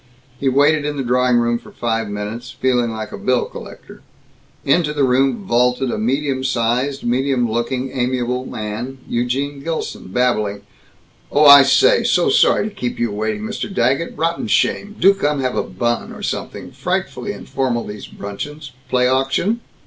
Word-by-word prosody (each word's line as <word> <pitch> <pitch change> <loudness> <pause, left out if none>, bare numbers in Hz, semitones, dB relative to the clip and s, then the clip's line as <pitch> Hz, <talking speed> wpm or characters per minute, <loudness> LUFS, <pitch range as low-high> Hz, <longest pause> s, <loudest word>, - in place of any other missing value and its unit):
He 135 - +1
waited 145 +3 +3
in 145 0 -3
the 135 - -1
drawing 125 0 +2
room 120 0 +1
for - - -15
five 115 -2 -2
minutes, 105 +4 -5
feeling 125 -2 0
like 110 -1 -6
a - - -7
bill 125 -1 +1
collector. - - -11 0.6
Into 150 +1 +2
the 145 -2 +1
room 135 - +2
vaulted 125 -1 +1
a - - -3
medium 130 +3 -1
sized, 130 +2 0
medium 125 0 +1
looking, 120 +3 -2
amiable 125 0 -1
man, 110 +4 -5
Eugene 135 +4 -2
Gilson, 165 - -4
babbling, 105 -2 0 0.7
"Oh, 150 +1 +4
I 140 -1 +11
say, 465 - +4
so 425 - +2
sorry 460 - +4
to 215 - -8
keep 125 -11 -4
you 120 -2 -1
waiting, 110 - -3
Mr. 215 -1 -4
Daggett. 135 +1 0
Rotten 165 -4 -1
shame, 205 - 0
do 195 +3 +6
come 150 -7 -1
have 130 -1 -1
a - - +1
bun 120 +6 -2
or - - -10
something, - - -4
frightfully - - -3
informal 125 -3 -2
these 105 0 -8
bruncheons, 145 +9 -7 0.2
play 125 -1 +2
auction?" 135 - +1
130 Hz, 165 wpm, -19 LUFS, 120-145 Hz, 0.7 s, I